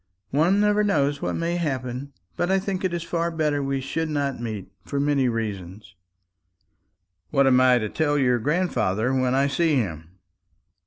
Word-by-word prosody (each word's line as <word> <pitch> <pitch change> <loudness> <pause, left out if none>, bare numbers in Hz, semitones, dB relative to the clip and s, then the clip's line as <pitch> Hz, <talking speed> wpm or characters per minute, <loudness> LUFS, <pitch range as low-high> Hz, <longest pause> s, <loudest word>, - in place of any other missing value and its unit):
"One 170 +8 +3
never 210 0 +3
knows 145 -8 +1
what - - -2
may 170 +1 -1
happen; 130 -4 -3 0.2
but 175 - -1
I 190 - +3
think 190 0 -3
it 185 - 0
is 170 -1 -3
far 170 0 -1
better 155 -3 0
we 135 0 -1
should 160 +4 -3
not 140 -4 -2
meet, 105 -5 -5
for 140 - -3
many 140 -3 +2
reasons." 100 -3 -5 1.4
"What 140 +5 +3
am 130 -1 +5
I 130 -1 +5
to 110 -3 -1
tell 145 +4 0
your 125 -3 +2
grandfather 130 - 0
when 130 -1 +1
I 135 +1 +3
see 155 +2 +1
him?" 85 - -3
140 Hz, 170 wpm, -24 LUFS, 125-165 Hz, 1.4 s, am